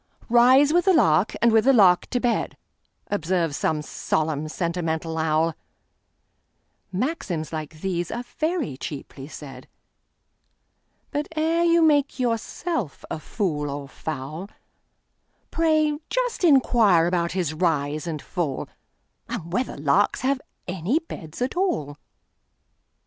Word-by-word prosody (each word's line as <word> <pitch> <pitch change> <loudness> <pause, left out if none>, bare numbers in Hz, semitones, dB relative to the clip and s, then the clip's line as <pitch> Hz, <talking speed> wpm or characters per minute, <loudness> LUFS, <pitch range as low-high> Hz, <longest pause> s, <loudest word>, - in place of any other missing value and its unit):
"Rise 260 +5 +6
with 350 0 +3
the 380 - +5
lark, 175 - +3
and 235 - +6
with 220 0 +4
the 270 - +6
lark 185 -7 +5
to 245 - -1
bed,"Observes 185 - -2
some 155 0 -1
solemn, 155 0 -1
sentimental 165 -1 -2
owl; 160 +1 +1 1.4
Maxims 185 - -3
like 155 0 -6
these 175 -3 -2
are 240 - -4
very 310 - -2
cheaply 140 -1 -7
said; 135 -4 -10 1.4
But, 290 +1 -2
ere 325 +2 +2
you 335 0 +4
make 290 -3 +3
yourself 240 - -2
a - - -3
fool 155 -6 -2
or 140 0 -5
fowl, 155 +6 -6 1.0
Pray 310 -2 +2
just - - -1
inquire 235 - +5
about 170 -1 0
his 175 -5 -1
rise 155 -2 0
and 155 -3 -4
fall, 165 -8 -3 0.6
And 180 -8 -5
whether 245 +5 -1
larks 150 +8 +2
have 265 +1 0 0.3
any 185 - 0
beds 245 - -5
at 255 - -3
all! 250 - -1
180 Hz, 120 wpm, -24 LUFS, -, 1.4 s, Rise